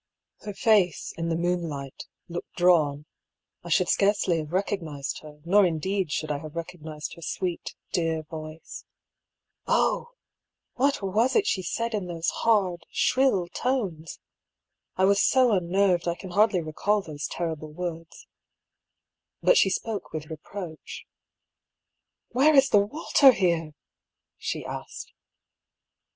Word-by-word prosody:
Her 205 - -7
face, 200 -6 +2
in 165 0 -3
the 165 - 0
moonlight, 165 -6 -3 0.2
looked 175 0 -7
drawn 155 -5 +3 0.3
— - - -57
I 175 - -8
should 175 +2 +3
scarcely 195 -4 +2
have 155 -1 -6
recognised 170 -7 -2
her, 150 -1 -14
nor 200 +4 +5
indeed 180 +1 0
should 155 0 -2
I 145 - -2
have 155 +1 -10
recognised 160 -3 -6
her 170 - -13
sweet, 180 +1 -4 0.2
dear 165 -2 0
voice. 155 0 -9 0.8
Oh! - - +1 0.6
what 275 -3 +1
was 215 +7 +1
it 420 - +4
she 190 - 0
said, 230 +6 -2
in 200 -4 -2
those 170 -1 -1
hard, 185 -7 +1
shrill 255 -10 +2
tones? 190 -13 -2 0.8
I 190 - +3
was 200 +1 +4
so 255 -2 +4
unnerved, 180 -1 +2
I 170 - 0
can 185 0 -9
hardly 205 -1 +3
recall 200 +6 0
those 150 -3 -5
terrible 160 -3 -4
words. 165 0 -6 1.2
But - - +6
she 195 - +5
spoke 205 +1 -3
with 155 0 -6
reproach. 180 - -8 0.6
" - - -59
Where 285 +5 +4
is 270 -1 +6
the 205 - +6
water 275 +3 +4
here? 170 -6 0 0.3
" - - -61
she - - -4
asked. - - -7
175 Hz, 140 wpm, -26 LUFS, 160-205 Hz, 1.2 s, But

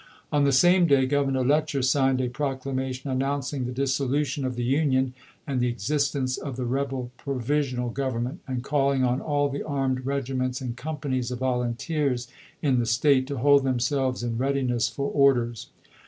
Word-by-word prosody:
On 145 -1 +3
the 140 - +3
same 175 +6 +5
day 140 -3 +4
Grovernor 135 -2 +1
Letcher 150 -1 +1
signed 130 0 +2
a 125 - 0
proclamation 130 0 -3
announcing 135 0 -1
the 125 - -3
dissolution 135 +1 0
of 130 -1 -2
the 120 - -2
Union 130 -1 +1 0.3
and 135 -4 -1
the 125 - +2
existence 130 +2 -1
of 135 -3 -5
the 125 0 -3
rebel 130 -1 -2
Provi 140 +1 -1
sional 125 -4 -2
Government, 130 +2 -2
and 130 -2 -3
calling 140 -1 +1
on 125 +1 +1
all 145 -1 +1
the 140 0 -4
armed 135 -3 -1
regiments 130 -2 -1
and 125 -3 -4
companies 135 -3 -3
of 125 - -4
volunteers 125 +1 -1 0.4
in 135 -4 +3
the 120 - 0
State 130 +3 +3
to 140 -1 -4
hold 140 +2 +5
themselves 130 0 0
in 115 -1 -2
readiness 130 -3 +1
for 140 0 -3
orders. 125 -6 +2
130 Hz, 170 wpm, -26 LUFS, 125-140 Hz, 0.4 s, same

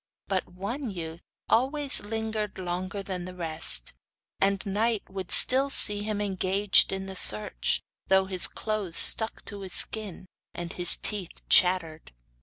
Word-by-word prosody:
But 190 -2 -2
one 220 +9 -6
youth 165 -3 -8 0.3
always 275 +4 +1
lingered 220 -1 -5
longer 185 +2 -5
than 185 -2 -6
the 185 0 -10
rest, 160 - 0 0.5
and 195 0 0
night 215 +2 -1
would 190 -2 -7
still 270 +2 +4
see 205 -6 +1
him 210 0 -4
engaged 195 0 +2
in 190 0 -5
the 190 0 -9
search, 105 - -1 0.2
though 190 0 +3
his 185 -2 +3
clothes 210 -6 -2
stuck 220 0 +6
to 205 - -7
his 190 -2 -6
skin 210 -5 -1 0.3
and 175 0 -6
his 175 -1 +6
teeth 200 -5 -3
chattered. 170 - +2
195 Hz, 145 wpm, -26 LUFS, 180-210 Hz, 0.5 s, stuck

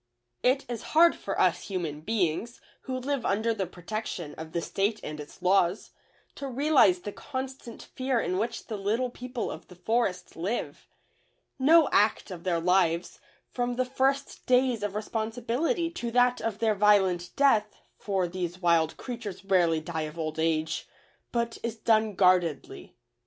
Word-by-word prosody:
It 260 +2 +2
is 235 -2 -4 0.2
hard 340 +1 +7
for - - -4
us - - +2
human 170 -7 -3
beings, 210 +3 -1 0.3
who 260 -1 -3
live 265 0 -2
under 220 +3 +1
the 195 -4 -2
protection 180 -3 -5
of 160 0 -9
the 170 - -1
State 200 +5 -1
and 150 0 -6
its 150 +4 -11
laws, 180 +1 +2 0.4
to 280 - -6
realize 265 - +4
the 205 - -5
constant 260 -1 -7
fear 260 -2 -1
in 185 -3 -1
which 230 +2 -3
the 215 - -5
Little 225 +6 -1
People 250 0 -5
of - - -9
the 180 - -14
Forest 200 0 -1
live. 195 +9 -4 0.7
No 315 +4 +6
act 210 -1 +2
of 175 -1 -8
their 175 -2 +1
lives, 175 -1 +1 0.3
from 245 0 -1
the 255 +1 +1
first 270 +2 -1
days 250 -2 +3
of 205 -1 -3
responsibility 240 - -1
to 240 -9 -4
that 245 +1 +3
of 225 -2 -2
their 220 -1 +2
violent 190 -4 +3
death 220 -7 +3 0.2
(for 190 -3 0
these 175 0 -4
wild 170 -3 +2
creatures 230 -6 -7
rarely 175 -5 +3
die 160 0 -4
of 150 - -14
old 155 -1 -3
age) 160 -1 0 0.4
but 235 -1 -2
is 230 -1 -3
done 220 -2 +2
guardedly. 180 -6 +1
210 Hz, 160 wpm, -28 LUFS, 180-245 Hz, 0.7 s, hard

